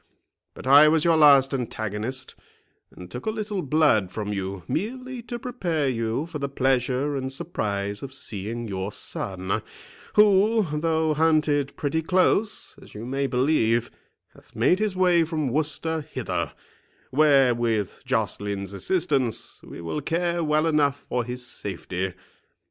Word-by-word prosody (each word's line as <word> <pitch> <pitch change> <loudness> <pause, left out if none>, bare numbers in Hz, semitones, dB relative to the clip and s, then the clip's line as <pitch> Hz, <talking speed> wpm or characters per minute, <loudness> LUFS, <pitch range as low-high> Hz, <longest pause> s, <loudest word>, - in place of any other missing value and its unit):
But - - -10
I 140 +3 +8
was 155 +1 +3
your 165 -1 +5
last 140 -3 +6
antagonist, 120 +1 -4 0.6
and 90 0 -12
took 125 - -7
a - - +3
little 215 -3 -3
blood 145 - +3
from 105 +1 -4
you, 95 -2 -4
merely 255 +6 -3
to 240 +1 -6
prepare 180 - -2
you 115 +3 -1
for 165 -2 -6
the 140 0 -2
pleasure 135 +1 +1
and 130 -1 -3
surprise 100 - -3
of 135 - -7
seeing 115 -2 -5
your 95 0 -3
son, 95 -2 -2 0.5
who, 210 +1 +5
though 160 -1 +1
hunted 150 -3 +2
pretty 155 +2 -1
close, 185 +5 +1
as - - -15
you 110 +2 -6
may 135 +2 -1
believe, 125 -3 +1 0.4
hath - - -21
made 185 - +3
his 215 -3 0
way 180 -2 +4
from 155 -4 -2
Worcester 155 +3 -1
hither, 130 - -4 0.6
where, 135 -3 +5
with 115 -4 -1
Joceline's 100 -5 -2
assistance, 135 - -1
we - - -10
will 85 - -3
care 170 +3 -1
well 155 0 +2
enough 145 -3 +2
for 125 -1 -2
his 125 +1 -5
safety. 95 -4 -4
140 Hz, 145 wpm, -25 LUFS, 115-160 Hz, 0.6 s, I